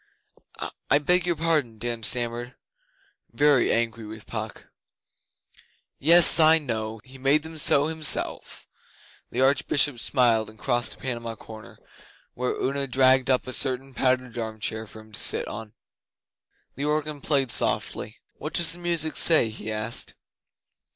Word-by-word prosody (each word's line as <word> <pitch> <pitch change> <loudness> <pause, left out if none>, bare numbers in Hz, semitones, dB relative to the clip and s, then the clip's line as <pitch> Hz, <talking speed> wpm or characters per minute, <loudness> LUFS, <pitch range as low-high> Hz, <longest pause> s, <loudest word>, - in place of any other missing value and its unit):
'I - - +5
beg 180 +5 +1
your 175 - 0
pardon,' 155 -8 -1
Dan 120 +1 -4
stammered 120 +2 -1 0.8
very 145 -4 +2
angry 115 0 -1
with 110 0 -10
Puck. 110 -1 -7 1.3
'Yes, 170 +1 +7
I 160 0 +6
know! 110 -6 -5
He 130 +1 -15
made 140 +3 +1
them 160 0 -10
so 145 -2 +4
Himself.' 160 -1 -2 0.6
The 125 - -3
Archbishop 140 -1 +2
smiled, 115 -3 +1
and 110 - -17
crossed 120 +3 -1
to - - -15
Panama 115 -3 -5
Corner, 110 -1 -13 0.6
where 125 +1 -3
Una 140 +1 -2
dragged 130 0 +3
up 130 -1 +1
a 130 - -5
certain 135 0 -1
padded 130 -1 -1
arm 110 -1 -6
chair 110 +1 -4
for 110 - -12
him 110 0 -19
to 100 - -4
sit - - +2
on. 105 0 -9 1.0
The 140 - -5
organ 150 -1 -2
played 135 -4 +1
softly. - - 0 0.2
'What - - -8
does 170 -1 +3
that 175 - -8
music 170 -3 -2
say?' 155 -9 +5
he 110 0 -8
asked. 110 +2 -3
130 Hz, 145 wpm, -24 LUFS, 115-150 Hz, 1.3 s, Yes